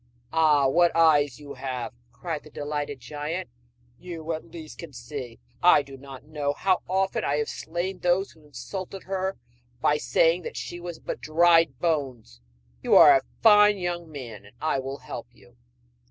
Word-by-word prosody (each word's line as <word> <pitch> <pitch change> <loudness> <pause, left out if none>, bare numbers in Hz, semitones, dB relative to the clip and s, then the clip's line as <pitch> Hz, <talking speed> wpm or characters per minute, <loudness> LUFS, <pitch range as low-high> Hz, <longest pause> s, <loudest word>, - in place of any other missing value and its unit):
'Ah, 150 -4 +4
what 170 +5 +3
eyes 150 -5 +4
you 145 -1 -9
have!' 130 -2 -5 0.2
cried 155 +5 -5
the - - -15
delighted 145 -1 -4
giant, 150 +5 -5 0.5
'you 165 -2 -5
at 160 - -6
least 160 -2 -10
can 165 -3 -8
see! 120 -1 -8 0.2
I 175 -4 +6
do 135 -1 -11
not 135 -1 -11
know 145 -1 -2
how 185 +4 +1
often 190 +1 0
I 140 - +1
have 150 0 -1
slain 175 +3 -4
those 180 +2 +1
who 160 - -21
insulted 180 +8 -7
her 190 0 -2 0.4
by 150 - +2
saying 165 +3 +2
she 175 - -6
was 175 -1 -7
but - - -6
dried 165 -3 +4
bones! 130 - -2 0.4
You - - +3
are - - +9
a - - +3 0.2
fine 210 0 +7
young 175 -3 -4
man, 120 -8 -8
and 105 +3 -17
I 155 -3 0
will 135 +1 -5
help - - -8
you.' - - -21
155 Hz, 170 wpm, -26 LUFS, 140-175 Hz, 0.5 s, are